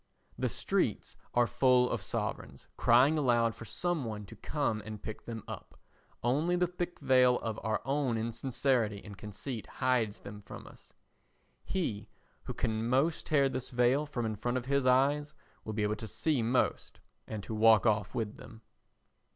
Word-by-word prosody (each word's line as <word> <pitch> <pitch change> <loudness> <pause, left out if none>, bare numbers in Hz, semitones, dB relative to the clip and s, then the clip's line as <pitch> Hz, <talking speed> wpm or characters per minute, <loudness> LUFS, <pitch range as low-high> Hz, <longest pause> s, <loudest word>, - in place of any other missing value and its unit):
The - - -1
streets - - -1 0.2
are 120 0 +5
full 125 0 +4
of - - -2
sovereigns 70 -1 -4
crying 135 +7 +5
aloud 120 -4 +3
for 115 - -10
some 170 - -1
one 105 -3 -5
to - - -12
come 130 -8 -1
and 110 0 -7
pick 110 - -8
them 115 -2 -6
up, - - -9 0.4
only 150 +9 +2
the 180 0 +3
thick 175 0 -4
veil 125 -1 +5
of 110 -2 -3
our 110 0 -1
own 135 -4 0
insincerity 115 -1 0
and 105 -2 -9
conceit 105 +4 -6
hides 125 -5 0
them 105 +1 -9
from - - -10
us. - - -16 0.7
He 135 - -3 0.4
who - - -4
can 110 0 -1
most 135 +6 +1
tear 140 -3 +4
this 130 -1 -4
veil 125 +4 +2
from 120 -5 -3
in 110 -1 -2
front 120 +4 -1
of 125 - -4
his 140 -1 +1
eyes 145 +4 +3 0.3
will 110 - -5
be 105 0 -1
able 105 +1 0
to 110 - -6
see 145 +4 0
most 120 +3 0 0.3
and 105 -2 -5
to 110 - -6
walk 110 0 +5
off 105 -4 +1
with 110 -2 -2
them. 115 -1 -13
120 Hz, 175 wpm, -31 LUFS, 110-135 Hz, 0.7 s, are